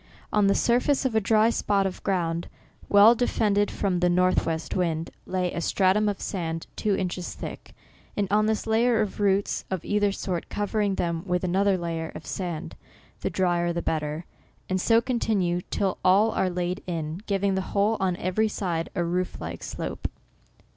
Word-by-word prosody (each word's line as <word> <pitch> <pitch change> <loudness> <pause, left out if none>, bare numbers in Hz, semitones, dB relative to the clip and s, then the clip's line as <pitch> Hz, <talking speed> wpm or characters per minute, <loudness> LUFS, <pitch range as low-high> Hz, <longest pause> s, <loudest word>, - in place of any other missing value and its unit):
On 210 -1 +4
the 200 - +3
surface 250 +4 +2
of 255 - +1
a 220 - +3
dry 220 +2 +4
spot 200 -3 +1
of 190 - -3
ground, 170 -3 -1 0.4
well 205 +3 +8
defended 210 -4 +1
from 190 -3 -1
the 180 0 +3
northwest 175 -2 +1
wind, 165 -3 -1 0.2
lay 180 -1 -1
a 170 - -2
stratum 195 +4 +2
of 200 - -3
sand, 165 -4 -3
two 210 -2 +1
inches 180 -1 -3
thick, - - -8 0.4
and 205 -1 +1
on 215 +1 +3
this 220 -1 0
a - - -5
layer 230 +1 +3
of 210 -1 -3
roots, 200 -1 +1
of 190 -3 -3
either 205 -1 +2
sort, 185 -3 -4
covering 205 -1 0
them 170 -2 -1
with 180 0 0
another 190 +2 +2
layer 165 -2 -3
of - - -8
sand, 175 -3 -4 0.4
(the - - -2
drier 175 -2 +1
the 170 0 -3
better) 155 +1 -2 0.4
and 185 0 0
so 230 +3 +4
continue 200 -8 0
till 195 -2 -1
all 200 +4 +5
are 185 - +1
laid 180 +1 -2
in, 165 0 -3
giving 200 -1 +1
the 190 - 0 0.2
whole, 210 +3 +3
on 185 -2 +1
every 185 +5 +1
side, 175 -6 -2
a 175 - +1
roof 180 +2 -2
like 85 +1 -6
slope. - - -4
190 Hz, 180 wpm, -26 LUFS, 175-205 Hz, 0.4 s, well